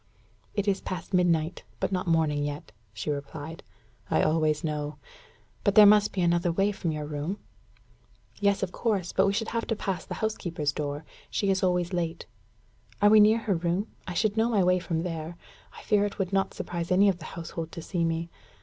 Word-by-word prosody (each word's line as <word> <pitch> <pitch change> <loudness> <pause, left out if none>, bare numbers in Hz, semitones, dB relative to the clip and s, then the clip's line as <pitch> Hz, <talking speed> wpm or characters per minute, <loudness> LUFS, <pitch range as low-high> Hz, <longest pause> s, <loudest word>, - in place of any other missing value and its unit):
"It 205 -1 -1
is 195 -1 +1
past 185 0 -6
midnight, 175 -2 +2 0.2
but - - -1
not 185 -1 -1
morning 155 -3 +2
yet," 145 -6 -5 0.2
she 110 +8 -3
replied, 145 +3 -6 0.5
"I - - +3
always 155 -1 +2
know. 150 -1 -3 0.7
But 200 -1 +2
there 215 - +10
must 210 0 +6
be 190 - -2
another 175 0 +2
way 195 +4 +2
from 175 -4 -2
your 150 -1 -4
room?" 150 +6 -3 1.0
"Yes, 200 -1 +2
of 185 - -2
course; 200 -6 -1
but 190 +1 +4
we 195 - +2
should 225 +2 -1
have 230 0 -2
to 225 - 0
pass 190 -4 -3
the - - -6
housekeeper's 170 -9 -2
door 145 +1 -4 0.2
she 200 -2 +1
is 190 - +1
always 180 -1 +1
late." 170 -2 -2 0.7
"Are 205 0 +5
we 215 - +8
near 215 +2 +6
her 225 -3 0
room? 175 +4 -1 0.2
I 180 - -4
should 215 +3 +1
know 225 +1 +3
my 210 -5 +3
way 180 0 +3
from 165 -2 -2
there. 165 -1 -5 0.4
I - - -11
fear 210 -1 +3
it 205 - -5
would 195 -1 -2
not 195 0 +1
surprise 175 0 -4
any 195 +3 +5
of 185 -3 +1
the 155 - -9
household 165 0 -5
to 165 - -7
see 175 -1 -1
me. 165 0 -1
175 Hz, 205 wpm, -27 LUFS, 160-200 Hz, 1.0 s, there